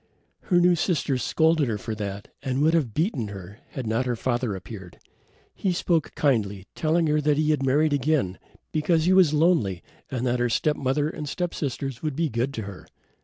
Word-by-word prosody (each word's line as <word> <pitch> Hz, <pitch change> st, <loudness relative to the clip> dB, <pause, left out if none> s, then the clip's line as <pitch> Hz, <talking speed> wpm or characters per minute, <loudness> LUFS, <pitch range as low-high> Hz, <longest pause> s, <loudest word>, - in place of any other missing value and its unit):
Her 175 Hz, -2 st, +3 dB
new 175 Hz, 0 st, +5 dB
sisters 155 Hz, -6 st, 0 dB
scolded 160 Hz, +2 st, +2 dB
her 110 Hz, -3 st, -1 dB
for 110 Hz, +2 st, -5 dB
that 100 Hz, -1 st, -5 dB
and 130 Hz, -1 st, -2 dB
would 160 Hz, +2 st, +4 dB
have 150 Hz, -9 st, +1 dB
beaten 155 Hz, -, 0 dB
her 100 Hz, +1 st, -9 dB
had 130 Hz, -, -4 dB
not 115 Hz, +4 st, 0 dB
her 120 Hz, -, 0 dB
father 120 Hz, -2 st, -1 dB
appeared. 95 Hz, -2 st, -9 dB, 0.6 s
He 190 Hz, -, -1 dB
spoke 165 Hz, -3 st, 0 dB
kindly, 105 Hz, -9 st, 0 dB
telling 165 Hz, +1 st, +1 dB
her 150 Hz, -1 st, +2 dB
he 150 Hz, +1 st, +2 dB
had 150 Hz, -3 st, +1 dB
married 145 Hz, +3 st, +3 dB
again, 140 Hz, -, 0 dB, 0.3 s
because 160 Hz, +1 st, +1 dB
he 185 Hz, -, +4 dB
was 185 Hz, -5 st, +6 dB
lonely 150 Hz, -, +2 dB, 0.3 s
and 130 Hz, -2 st, -2 dB
that 125 Hz, 0 st, +1 dB
her 120 Hz, 0 st, +1 dB
step 150 Hz, +6 st, +1 dB
mother 140 Hz, +2 st, 0 dB
and 150 Hz, -2 st, -5 dB
step 175 Hz, +3 st, -2 dB
sisters 135 Hz, -2 st, -4 dB
would 155 Hz, -3 st, -2 dB
be 165 Hz, +1 st, 0 dB
good 120 Hz, +3 st, -1 dB
to 110 Hz, -, -3 dB
her. 100 Hz, -2 st, -9 dB
140 Hz, 195 wpm, -25 LUFS, 115-155 Hz, 0.6 s, was